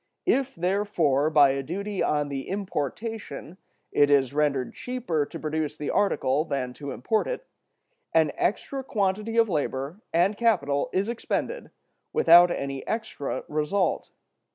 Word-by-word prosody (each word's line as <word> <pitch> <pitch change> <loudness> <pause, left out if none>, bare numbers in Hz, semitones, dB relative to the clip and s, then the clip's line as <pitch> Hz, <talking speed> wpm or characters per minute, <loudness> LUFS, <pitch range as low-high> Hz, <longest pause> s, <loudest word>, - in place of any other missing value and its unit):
If, 275 -7 +1
therefore, 175 -6 +1
by 145 -3 +6
a 135 0 -1
duty 195 +7 -4
on 145 -1 +1
the 135 -1 -5
importation, 195 - -4 0.3
it 145 0 +4
is 140 -2 +3
rendered 145 -3 0
cheaper 235 - -2
to - - -8
produce 155 -1 -2
the 150 - -3
article 150 -7 +2
than 135 -5 -3
to 140 +2 -7
import 215 - 0
it, - - -4 0.7
an 160 -2 +3
extra 270 +6 -1
quantity 215 0 -1
of 230 -1 +5
labor 145 +1 -2
and 180 +5 +3
capital 145 -12 +1
is 195 +2 0
expended, 360 - -3 0.4
without 175 +1 +7
any 140 -4 -3
extra 220 -10 -3
result. 155 +4 0
165 Hz, 135 wpm, -26 LUFS, 145-210 Hz, 0.7 s, without